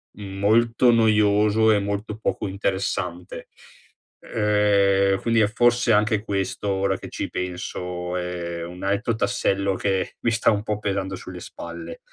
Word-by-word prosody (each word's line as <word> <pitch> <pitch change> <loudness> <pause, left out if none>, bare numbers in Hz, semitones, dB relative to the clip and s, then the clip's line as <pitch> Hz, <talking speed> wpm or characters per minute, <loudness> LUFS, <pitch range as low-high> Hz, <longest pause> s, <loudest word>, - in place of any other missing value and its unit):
mhmm, 95 -2 -8
molto 115 +4 +4
noioso 105 -1 +4
e 105 - +3
molto 100 +1 -3
poco 110 - -2
interessante, 95 -2 -3 0.7
ehm, 100 -2 +2
quindi 115 -1 +2
è 105 - +4
forse 120 +1 +3
anche 105 0 +2
questo, 100 0 -2
ora 95 -1 0
che - - -9
ci - - -4
penso, 90 0 -4
è 85 -1 -4
un 90 +1 -9
altro 100 +4 0
tassello 100 -4 0
che 95 -1 -1
mi 115 - +1
sta 115 0 +3
un 105 -1 -1
po' 105 -1 -2
pesando 95 -2 -2
sulle - - -9
spalle. 85 -1 -8
100 Hz, 145 wpm, -23 LUFS, 95-110 Hz, 0.7 s, molto